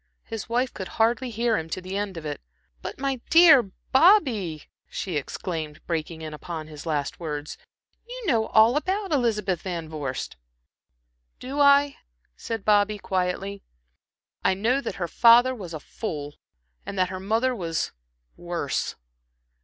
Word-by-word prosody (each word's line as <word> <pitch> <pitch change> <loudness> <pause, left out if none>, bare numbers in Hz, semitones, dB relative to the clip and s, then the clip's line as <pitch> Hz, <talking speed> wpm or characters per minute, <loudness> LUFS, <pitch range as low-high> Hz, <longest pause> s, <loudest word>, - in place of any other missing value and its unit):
His 225 -2 -6
wife 245 +2 0
could 190 - -6
hardly 235 +3 +2
hear 230 0 +1
him 160 0 -7
to 175 - -3
the 185 +1 -6
end 200 -3 -3
of 160 - -7
it. 145 -1 -4 0.4
"But, - - -6
my 270 -2 -2
dear 330 -5 +8 0.3
Bobby" 260 - +4 0.3
she 185 -4 -4
exclaimed, 155 +1 -4
breaking 160 -1 -3
in 155 -1 -6
upon 160 +1 -6
his 155 +1 -10
last 150 -3 -2
words, 150 -3 -5 0.5
"you - - -7
know 230 - +2
all 225 +3 +5
about 380 +4 -1
Elizabeth 210 - +1
Van 170 -4 -4
Vorst!" 145 - -5 1.0
"Do 275 +3 -5
I," 280 0 +5 0.4
said 225 - -5
Bobby, 210 0 +3
quietly. 190 +1 -2 0.8
"I 190 - +3
know 235 +8 +1
that - - -4
her 175 -3 -3
father 240 +6 +6
was 195 -9 -8
a 155 - -5
fool, 145 -4 -6 0.5
and 200 - -7
that 185 -1 +2
her 185 0 -5
mother 225 +6 +1
was 165 -6 -2 0.4
worse. 170 -5 -3
200 Hz, 150 wpm, -25 LUFS, 165-245 Hz, 1.0 s, dear